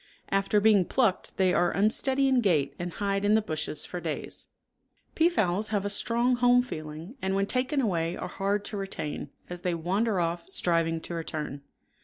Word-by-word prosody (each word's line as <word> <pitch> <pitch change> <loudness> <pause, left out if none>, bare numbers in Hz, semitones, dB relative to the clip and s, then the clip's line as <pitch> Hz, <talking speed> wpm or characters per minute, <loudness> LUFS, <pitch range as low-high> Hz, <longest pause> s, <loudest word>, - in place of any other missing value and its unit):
After 195 +1 +2
being 205 -2 +5
plucked 225 -5 0
they 185 -1 +3
are 175 0 +3
unsteady 260 +8 +2
in 260 -2 +3
gait 150 -10 +2
and 175 -1 -4
hide 200 -1 -1
in 205 +1 +4
the - - +5
bushes 155 -4 -3
for 180 - -5
days. 160 -2 -5 0.7
Peafowls 215 - +2
have 205 -2 -1
a 205 - 0
strong 240 +4 +1
home 245 0 +5
feeling 155 - -7
and 190 0 0
when 195 0 +2
taken 260 +6 0
away 175 -8 0
are - - -4
hard 200 +1 -1
to 210 - -5
retain; 175 -7 -5 0.2
as 175 0 -7
they 180 -2 0
wander 190 +5 0
off, 170 0 -1
striving 165 -3 0
to 175 - -7
return. 150 -4 -4
195 Hz, 180 wpm, -28 LUFS, 170-220 Hz, 0.7 s, being